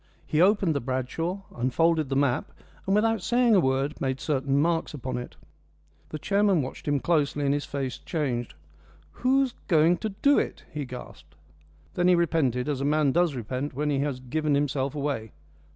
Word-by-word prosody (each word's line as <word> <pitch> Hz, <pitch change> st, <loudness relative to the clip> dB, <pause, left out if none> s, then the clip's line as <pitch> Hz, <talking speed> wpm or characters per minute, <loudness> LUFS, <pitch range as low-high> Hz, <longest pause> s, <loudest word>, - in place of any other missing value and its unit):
He 155 Hz, -, +1 dB
opened 195 Hz, -3 st, +4 dB
the 140 Hz, -, 0 dB
Bradshaw, 130 Hz, +9 st, -3 dB
unfolded 150 Hz, +5 st, +1 dB
the 135 Hz, -, -1 dB
map, 135 Hz, -3 st, +1 dB, 0.4 s
and, 195 Hz, -, +3 dB
without 225 Hz, 0 st, +2 dB
saying 240 Hz, +3 st, +3 dB
a 200 Hz, -, +6 dB
word, 135 Hz, 0 st, 0 dB
made 130 Hz, -1 st, -1 dB
certain 135 Hz, -2 st, 0 dB
marks 165 Hz, 0 st, 0 dB
upon 130 Hz, -2 st, -4 dB
it. 125 Hz, -, -9 dB, 0.7 s
The 155 Hz, -, -5 dB
chairman 200 Hz, -2 st, +2 dB
watched 130 Hz, -, -8 dB
him 145 Hz, -1 st, +2 dB
closely, 145 Hz, -2 st, +1 dB
and 140 Hz, -, +2 dB
his 145 Hz, 0 st, -2 dB
face 135 Hz, -2 st, -4 dB
changed. 130 Hz, -8 st, -3 dB, 0.7 s
"Who's 265 Hz, 0 st, +2 dB
going 165 Hz, 0 st, +4 dB
to 220 Hz, -, -3 dB
do 280 Hz, +8 st, +3 dB
it?" -, -, -4 dB
he 145 Hz, -1 st, -4 dB
gasped. 125 Hz, -1 st, -11 dB, 0.6 s
Then 175 Hz, -, +1 dB
he 180 Hz, -, +6 dB
repented, 150 Hz, -7 st, +1 dB
as 140 Hz, -3 st, -1 dB
a -, -, -1 dB
man 150 Hz, 0 st, +2 dB
does 170 Hz, -1 st, +2 dB
repent 130 Hz, +4 st, -4 dB
when 150 Hz, +2 st, 0 dB
he 140 Hz, -, +1 dB
has 140 Hz, -2 st, -1 dB
given 150 Hz, +3 st, -1 dB
himself 140 Hz, -1 st, -1 dB
away. 140 Hz, -7 st, -3 dB
145 Hz, 180 wpm, -26 LUFS, 130-170 Hz, 0.7 s, a